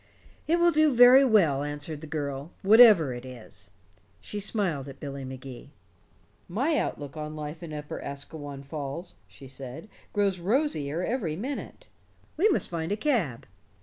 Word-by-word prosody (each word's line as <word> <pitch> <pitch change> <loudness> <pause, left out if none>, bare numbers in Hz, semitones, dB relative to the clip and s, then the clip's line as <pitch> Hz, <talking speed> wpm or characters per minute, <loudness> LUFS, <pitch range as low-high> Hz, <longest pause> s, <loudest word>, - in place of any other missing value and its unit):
"It 335 +2 +3
will 345 0 +4
do 310 -1 +4
very 245 +3 +8
well," 185 - +3
answered 145 +1 -4
the 160 - -8
girl, 145 -1 -4
"whatever 205 - +7
it 120 0 -7
is." 120 -6 -11 0.5
She 210 - -5
smiled 190 - -1
at 135 -1 -10
Billy 140 -1 -6
Magee. 130 0 -9 0.8
"My 265 - 0
outlook 145 0 -4
on 155 0 -6
life 150 +1 -6
in 170 -2 -8
Upper 150 -1 -6
Asquewan 140 0 -8
Falls," 145 +4 -6
she 135 - -14
said, 135 +7 -9 0.2
"grows 200 -3 +1
rosier 175 - 0
every 210 -10 -2
minute. 275 - -6 0.5
We 390 +8 +3
must 370 - +1
find 165 0 -4
a 205 - 0
cab." 205 - -1
155 Hz, 150 wpm, -27 LUFS, 140-215 Hz, 0.8 s, very